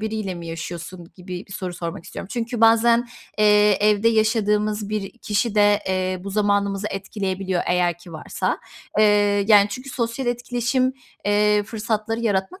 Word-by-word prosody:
biriyle 215 -3 -3
mi 170 -1 -8
yaşıyorsun 170 +1 -7
gibi 180 0 -8
bir 195 - -12
soru 185 -2 -5
sormak 165 -1 -6
istiyorum. - - -8
Çünkü 235 -1 -3
bazen, 230 +1 +5 0.3
eee, 210 -1 +5
evde 210 +2 +3
yaşadığımız 215 -2 +1
bir 210 +2 -4
kişi 215 +1 -1
de, 205 0 +4
eee, 185 -1 -1
bu 200 - -5
zamanımızı 200 0 0
etkileyebiliyor 190 -2 -3
eğer 175 -1 +1
ki 175 -1 -13
varsa. 155 - -3 0.4
Eee, 205 -1 +4
yani, 205 -1 +7
çünkü 255 +6 -7
sosyal 235 +1 -3
etkileşim, 245 +2 0 0.3
eee, 210 0 +3
fırsatları 220 +1 -3
yaratmak 205 - -1
210 Hz, 150 wpm, -22 LUFS, 190-225 Hz, 0.4 s, yani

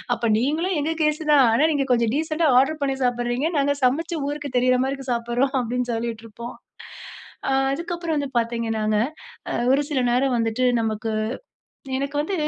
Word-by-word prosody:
அப்ப 230 -1 0
நீங்களும் 315 +8 0
எங்க 315 +3 -1
கேஸ் 305 +1 +1
தான். 275 -3 +6
ஆனா 235 - +3
நீங்க 275 -2 0
கொஞ்சம் 235 -2 +1
டீசென்ட்டா 315 +1 +1
ஆர்டர் 295 +3 0
பண்ணி 270 -1 0
சாப்பிடுறீங்க. 245 +4 0
நாங்க 285 +1 +2
சமைச்சு, 325 +7 0
ஊருக்கு 290 -3 -5
தெரிகிற 255 +1 +3
மாரி 265 +1 0
இருக்கு 270 -2 -5
சாப்பிடுறோம் 240 +3 0
அப்டின்னு 250 +1 -2
சொல்லிடிருப்போம். 230 0 -5 0.9
ஆ - - +1 0.2
அதுக்கப்புறம் 340 +3 -3
வந்து 285 -1 -2
பார்த்தீங்கனாங்க, 225 -2 0 0.5
ஆ - - -3 0.2
ஒரு 275 +2 +4
சில 290 -3 0
நேரம் 255 +2 +2
வந்துட்டு 230 +2 0 0.2
நமக்கு 220 0 -2 0.9
எனக்கு 280 +1 -3
வந்து 320 +7 -2
260 Hz, 160 wpm, -23 LUFS, 235-295 Hz, 0.9 s, தான்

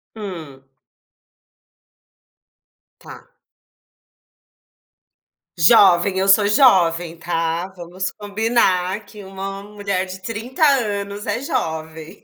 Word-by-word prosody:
Hum. 165 -11 -8 2.4
Tá. - - -14 2.3
Jovem, 185 +1 +5
eu 190 +1 0
sou 200 +1 +5
jovem, 175 - +3
tá, 165 +1 -2
vamos 180 +2 -5
combinar 205 -2 0
que 205 0 -13
uma 195 +1 -7
mulher 200 -2 -3
de 185 +1 -8
30 230 +8 -4
anos 205 -7 -1
é - - -1
jovem. 160 - -5
195 Hz, 85 wpm, -20 LUFS, 170-210 Hz, 2.4 s, Jovem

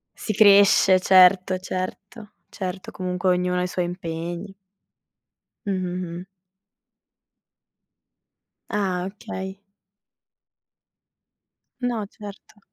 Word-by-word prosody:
Si 215 - -4
cresce, 200 -2 +6
certo, 185 0 +5
certo, 195 +4 -6 0.2
certo. 185 -1 -6
Comunque, 180 0 -2
ognuno 180 0 +1
ha - - 0
i - - -1
suoi 180 0 -2
impegni. 175 +2 -6 1.1
Mh-mh-mh. 180 -2 -4 2.4
Ah, 185 -3 -1
okay. 190 -1 -7 2.2
No, 240 -4 -2
certo. 205 +1 -12
185 Hz, 75 wpm, -23 LUFS, 180-200 Hz, 2.4 s, cresce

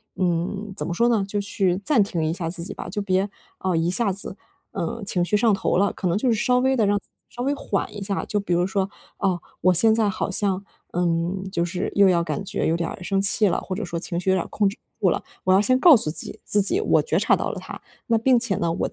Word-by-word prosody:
嗯， 185 +3 -2
怎 - - -3
么 - - -3
说 235 +7 +2
呢， 220 -4 +2
就 205 +1 -2
去 195 -3 0
暂 275 -8 +4
停 170 -5 -2
一 160 - 0
下 165 -1 -4
自 170 0 -4
己 180 - -5
吧。 - - -7
就 210 - -3
别， 195 0 0 0.3
啊， 185 -2 -1
一 165 +1 +1
下 205 +1 +2
子， 190 0 -5 0.4
呃， 210 +7 -4
情 185 -3 0
绪 210 +4 +1
上 220 0 +3
头 195 - 0
了， 200 +2 +2
可 185 - -3
能 175 +2 +1
就 250 +4 +1
是 - - +2
稍 250 0 +3
微 265 +1 +2
地 230 - +2
让 205 0 +2 0.3
稍 245 - -6
微 280 +2 +1
缓 210 -9 -3
一 205 - -6
下。 195 0 -2
就 210 - -1
比 200 -3 -2
如 175 +1 +2
说， 195 -1 -1 0.3
啊， 190 -3 0 0.2
我 185 - +4
现 220 +6 +6
在 220 -2 +2
好 195 - -3
像， 195 0 +1 0.3
嗯， 175 +2 -1
就 170 -3 0
是 175 +1 -3
又 200 -1 +6
要 170 -2 +2
感 155 +1 -3
觉 195 - -2
有 160 - +2
点 170 -1 -2
儿 - - -7
生 195 +2 0
气 200 +2 +4
了， 180 - 0
或 185 - -5
者 215 - -4
说 170 -1 -4
情 170 0 -2
绪 190 +1 0
有 - - +3
点 180 - 0
儿 - - -11
控 205 - +1
制 195 - -3 0.2
不 - - -2
住 - - +6
了， - - -2 0.2
我 185 - +3
要 190 - +5
先 255 +5 +3
告 330 +1 +8
诉 210 -10 +1
自 - - -2
己 - - -6
自 205 - +3
己 370 - +2
我 - - +3
觉 - - 0
察 - - +3
到 - - -3
了 - - -6
它。 - - -9 0.3
那 230 -2 +3
并 245 +2 +3
且 230 -5 0
呢， 170 -1 -1
我 170 - -2
195 Hz, 300 characters per minute, -23 LUFS, 175-210 Hz, 0.4 s, 告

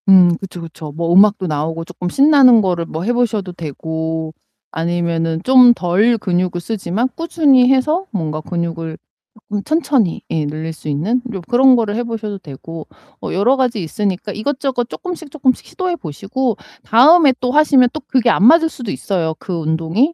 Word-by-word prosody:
음 180 -3 +6
그쵸, 180 -2 -9
그쵸. 160 -2 -9
뭐 170 +1 -1
음악도 195 0 +4
나오고 160 +2 -3
쪼끔 180 +1 -6
신나는 270 - +5
거를 175 -4 -1
뭐 160 +1 -6
해 240 +5 0
보셔도 220 -6 -1
되고 160 0 -5 0.4
아니면은 165 0 -2
좀 255 -2 +6
덜 210 +5 +1
근육을 180 -3 -1
쓰지만 210 +4 -2
꾸준히 290 -7 +3
해서 305 +8 +1
뭔가 155 -7 -3
근육을 165 -1 -4 0.5
쪼끔 205 -1 -3
천천히 290 - 0
예 155 -2 -1
늘릴 155 +2 -5
수 155 -1 -9
있는 190 - -1
요 190 - -5
그런 255 +1 +5
거를 220 -3 -1
해 240 - -2
보셔도 220 -3 -5
되고 160 +1 -10 0.3
어 - - -5
여러 215 +8 +2
가지 245 -7 -1
있으니까 195 +4 -3
이것저것 255 +2 -3
쪼끔씩, 345 -3 -7
쪼끔씩 265 -3 -1
시도해 370 -2 -3
보시고 215 - -3 0.3
다음에 285 +5 +5
또 250 0 -1
하시면 275 -4 +4
또 310 - -4
그게 250 -3 +2
안 195 - +1
맞을 325 +5 +6
수도 240 -9 -7
있어요, 165 -5 -2
그 185 - -6
운동이. 165 - 0
200 Hz, 350 characters per minute, -17 LUFS, 165-255 Hz, 0.5 s, 음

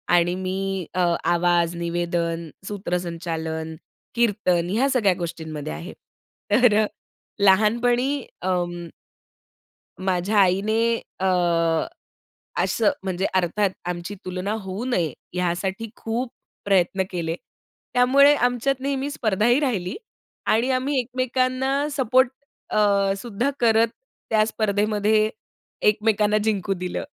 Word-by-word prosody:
आणि 175 +1 +3
मी 190 -1 -2
अ, 185 - -2 0.3
आवाज, 175 0 +2
निवेदन, 170 -1 -2 0.2
सूत्रसंचालन, 165 -4 -3 0.4
कीर्तन 195 -7 +1
ह्या 245 +8 +2
सगळ्या 210 -8 +3
गोष्टींमध्ये 160 - -5
आहे. 75 +2 -7 0.6
तर 215 -1 +5 0.5
लहानपणी 230 +6 +3 0.3
अं 175 -2 -2 1.2
माझ्या 190 +3 +1
आईने 195 +4 +3 0.4
अ, 190 - -1 1.4
असं 220 -3 +2
म्हणजे 190 0 -1
अर्थात 185 +3 +2 0.2
आमची 175 +3 -4
तुलना 185 +2 -3
होऊ 190 +4 -5
नये, 175 - 0 0.2
यासाठी 185 +4 -2
खूप 235 +3 -3 0.4
प्रयत्न 190 -1 +2
केले. 165 -2 -2 0.6
त्यामुळे 275 +4 +6
आमच्यात 245 +1 +1
नेहमी 275 0 -1
स्पर्धाही 235 +1 +2
राहिली 210 -11 -1 0.5
आणि 230 +4 +2
आम्ही 260 +2 +1
एकमेकांना 255 +3 0
सपोर्ट 255 -1 +4 0.4
अ, 215 - +1 0.4
सुद्धा 235 +4 -2
करत 230 -1 +4 0.4
त्या 215 -1 +4
स्पर्धेमध्ये 215 0 +1 0.6
एकमेकांना 210 0 +3
जिंकू 200 -3 0
दिलं. 180 0 -4
200 Hz, 100 wpm, -23 LUFS, 175-235 Hz, 1.4 s, त्यामुळे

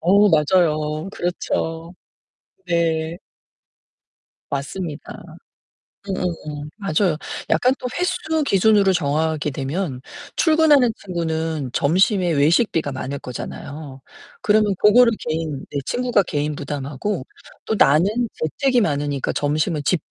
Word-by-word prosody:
어, 200 +4 +5
맞아요. 155 0 +2
그렇죠. 165 -1 -3 0.7
네. 165 -1 0 1.3
맞습니다. 145 +3 -5 0.9
응응응. 155 -6 -4
맞아요. 190 -4 +1 0.3
약간 255 +1 +3
또 250 - -3
횟수 320 -4 0
기준으로 200 -3 +4
정하게 155 -1 0
되면 140 +1 -3 0.4
출근하는 310 -7 +4
친구는 160 -6 -2
점심에 180 +4 +2
외식비가 155 - +2
많을 135 +2 -4
거잖아요. 135 +2 -8 0.4
그러면 210 -1 +3
그거를 230 +3 +6
개인 155 -3 -3
네 145 - -2
친구가 245 - +1
개인 150 -2 -2
부담하고 145 +4 -4 0.4
또 - - -1
나는 155 +1 +5 0.3
재택이 250 - +1
많으니까 145 -4 -1
점심은 150 +1 0
집 165 +2 +2
165 Hz, 250 characters per minute, -21 LUFS, 145-200 Hz, 1.3 s, 그거를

